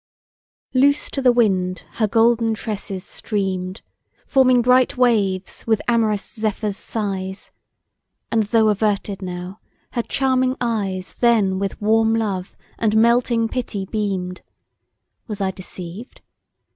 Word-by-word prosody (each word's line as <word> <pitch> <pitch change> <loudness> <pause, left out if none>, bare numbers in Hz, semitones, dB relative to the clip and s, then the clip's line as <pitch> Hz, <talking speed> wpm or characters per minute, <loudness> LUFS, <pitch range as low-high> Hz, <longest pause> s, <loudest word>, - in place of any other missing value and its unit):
LOOSE 285 +3 +3
to 275 - -2
the 255 -2 +5
wind 190 -6 +1
her 215 - +3
golden 225 +1 +3
tresses 205 -4 -5
stream'd, 190 -2 -3 0.4
Forming 255 -3 +4
bright 250 +1 +4
waves 200 -7 +1
with 220 -2 +3
amorous 220 -4 +1
Zephyr's 215 -2 -2
sighs; 195 -3 -4 0.8
And 225 - +3
though 220 0 +3
averted 205 -1 0
now, 180 +1 -6 0.3
her 240 - 0
charming 260 +1 +1
eyes 200 -6 -2
Then 215 -6 +3
with 195 -1 -3
warm 225 +1 +3
love, 200 -5 -3 0.2
and 220 -1 +2
melting 235 0 +3
pity 225 -5 -3
beam'd, 190 -3 -3 0.9
Was 210 -3 -5
I 190 -1 0
deceived? 185 +4 -9
215 Hz, 120 wpm, -21 LUFS, 195-235 Hz, 0.9 s, the